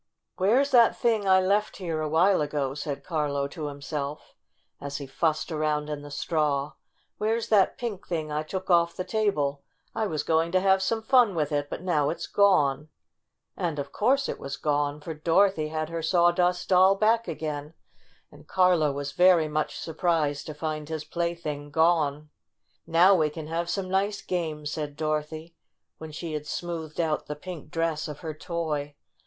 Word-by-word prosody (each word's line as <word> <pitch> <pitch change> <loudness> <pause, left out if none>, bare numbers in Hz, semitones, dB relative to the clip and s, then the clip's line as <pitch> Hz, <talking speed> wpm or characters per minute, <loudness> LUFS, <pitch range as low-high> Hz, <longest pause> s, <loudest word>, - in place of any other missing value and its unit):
"Where's 245 +9 +3
that 235 -3 +5
thing 220 -4 +1
I 190 0 +6
left 200 +3 +1
here 165 -4 -3
a 155 - -2
while 180 +3 +4
ago?" 145 -2 -1
said 145 -1 -5
Carlo 145 -4 -1
to 155 0 -5
himself, 145 0 -5 0.5
as 140 0 -5
he 140 - -6
fussed 155 +5 -1
around 150 -1 -1
in 145 -1 -4
the 145 - -10
straw. 150 -2 -1 0.5
"Where's 225 +2 0
that 205 -3 +3
pink 225 -6 -5
thing 160 -3 -3
I 150 0 -1
took 185 +4 -4
off 170 -1 +4
the 185 - -3
table? 150 -11 0 0.3
I 220 - -1
was 155 -5 -2
going 165 +1 +1
to 185 - +5
have 190 0 +3
some 220 +3 -1
fun 240 -5 +4
with 150 -2 -1
it, 145 -1 -1
but - - -6
now 150 -6 +1
it's 170 - -4
gone 150 -8 +2 0.3
!" - - -56 0.3
And 165 -4 -2
of 140 - -4
course 270 +5 +2
it - - -4
was 140 - -5
gone, 145 0 -1
for 160 +2 -5
Dorothy 165 +1 +2
had 155 0 -3
her 165 0 -3
Sawdust 175 +1 +2
Doll 190 +1 +6
back 225 +3 +2
again, 150 0 -5 0.6
and - - -16
Carlo 180 -5 +3
was 140 0 -4
very 180 -2 +5
much 150 0 -2
surprised 160 -3 -1
to 155 - -6
find 155 -1 -4
his 155 -1 -4
plaything 170 -3 -3
gone. 155 -2 +1 0.6
"Now 170 +4 +6
we 155 -5 +3
can 155 +1 -7
have 165 +2 -3
some 190 +1 -2
nice 195 +2 0
games," 155 -4 -3
said 150 -2 -4
Dorothy, 155 +1 -3 0.5
when 160 -1 -8
she 160 +1 -6
had 150 0 -4
smoothed 165 -2 -5
out 160 -2 0
the 150 - -4
pink 165 -1 -9
dress 165 -1 -1
of 150 -2 -8
her 160 -3 -4
toy. 155 -3 -3
160 Hz, 180 wpm, -27 LUFS, 150-185 Hz, 0.6 s, I